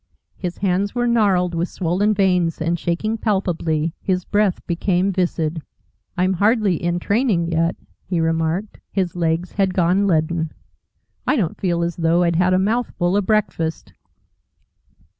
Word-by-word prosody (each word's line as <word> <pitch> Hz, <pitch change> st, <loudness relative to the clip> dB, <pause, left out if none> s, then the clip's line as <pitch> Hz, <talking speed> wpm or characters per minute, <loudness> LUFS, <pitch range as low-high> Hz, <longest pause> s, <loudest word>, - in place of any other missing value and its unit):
His 180 Hz, -2 st, -5 dB
hands 195 Hz, +2 st, 0 dB
were 240 Hz, 0 st, +1 dB
gnarled 200 Hz, -7 st, +2 dB
with 170 Hz, +2 st, -1 dB
swollen 190 Hz, +4 st, 0 dB
veins 180 Hz, -4 st, +2 dB
and 165 Hz, +1 st, -1 dB
shaking 215 Hz, +8 st, -1 dB
palpably, 170 Hz, -7 st, 0 dB
his 185 Hz, -2 st, -1 dB
breath 205 Hz, -3 st, +1 dB, 0.2 s
came 190 Hz, 0 st, +1 dB
viscid. 170 Hz, -3 st, -1 dB, 0.6 s
"I'm 185 Hz, +1 st, +2 dB
hardly 205 Hz, -2 st, +2 dB
in 175 Hz, 0 st, 0 dB
training 200 Hz, -3 st, +1 dB
yet," 165 Hz, +1 st, +1 dB, 0.3 s
he 180 Hz, -2 st, 0 dB
remarked. 165 Hz, +5 st, -1 dB
His 185 Hz, -3 st, -1 dB
legs 170 Hz, +1 st, -1 dB
had 190 Hz, -2 st, 0 dB
gone 185 Hz, +3 st, +2 dB
leaden. 160 Hz, -1 st, 0 dB, 0.7 s
"I -, -, +3 dB
don't 190 Hz, -, -2 dB
feel 170 Hz, -3 st, +1 dB
as 170 Hz, 0 st, -3 dB
though 170 Hz, +1 st, +2 dB
I'd 170 Hz, -1 st, +1 dB
had 180 Hz, +1 st, +3 dB
a -, -, +4 dB
mouthful 195 Hz, -3 st, 0 dB
of 205 Hz, -2 st, 0 dB
breakfast." 180 Hz, -7 st, -1 dB
180 Hz, 145 wpm, -21 LUFS, 170-200 Hz, 0.7 s, a